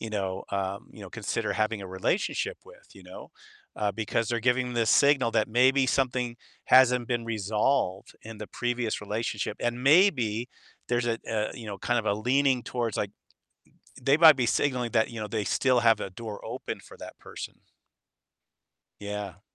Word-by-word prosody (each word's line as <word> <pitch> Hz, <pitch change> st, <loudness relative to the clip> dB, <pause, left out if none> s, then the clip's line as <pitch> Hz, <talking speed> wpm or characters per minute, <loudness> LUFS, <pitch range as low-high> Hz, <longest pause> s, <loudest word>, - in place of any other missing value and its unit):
you 115 Hz, -, -5 dB
know, 95 Hz, -2 st, -3 dB
um, 100 Hz, 0 st, -3 dB
you -, -, -13 dB
know, -, -, -10 dB
consider -, -, -2 dB
having 110 Hz, 0 st, -1 dB
a -, -, -7 dB
relationship 175 Hz, -, -1 dB
with, -, -, -17 dB
you -, -, -14 dB
know?" -, -, -11 dB, 0.5 s
Uh, 105 Hz, -1 st, 0 dB
because 110 Hz, +1 st, -2 dB
they're 120 Hz, -1 st, -1 dB
giving 125 Hz, +1 st, +1 dB
this 115 Hz, -2 st, +1 dB
signal 140 Hz, -4 st, +4 dB
that 110 Hz, -, +1 dB
maybe 130 Hz, +3 st, +4 dB
something 125 Hz, -2 st, 0 dB, 0.3 s
hasn't 125 Hz, -2 st, +5 dB
been 120 Hz, -2 st, -1 dB
resolved 110 Hz, -1 st, -1 dB
in 110 Hz, -1 st, -10 dB
the 105 Hz, -, -6 dB
previous 120 Hz, -2 st, -2 dB
relationship, 105 Hz, 0 st, -3 dB
and 120 Hz, +1 st, -2 dB
maybe 130 Hz, -, +3 dB, 0.4 s
there's 120 Hz, 0 st, +1 dB
a 115 Hz, -1 st, 0 dB
a, 110 Hz, -1 st, -1 dB
you 115 Hz, -3 st, -9 dB
know, 100 Hz, -2 st, -5 dB
kind 120 Hz, +5 st, 0 dB
of -, -, -3 dB
a 100 Hz, -, +2 dB
leaning 130 Hz, +3 st, +2 dB
towards, 120 Hz, -4 st, -3 dB
like -, -, -2 dB, 0.9 s
they 135 Hz, +3 st, +3 dB
might 160 Hz, -2 st, +8 dB
be 125 Hz, -3 st, +1 dB
signaling 125 Hz, -2 st, 0 dB
that, 110 Hz, 0 st, +2 dB
you 115 Hz, -2 st, -7 dB
know, 105 Hz, -, -3 dB
they 105 Hz, +1 st, -2 dB
still 130 Hz, +3 st, +2 dB
have 115 Hz, -2 st, +4 dB
a -, -, -3 dB
door 105 Hz, +1 st, -7 dB
open -, -, -5 dB
for -, -, -15 dB
that -, -, -11 dB
person. -, -, -9 dB, 1.4 s
Yeah. 105 Hz, -1 st, -6 dB
115 Hz, 180 wpm, -27 LUFS, 105-125 Hz, 1.4 s, might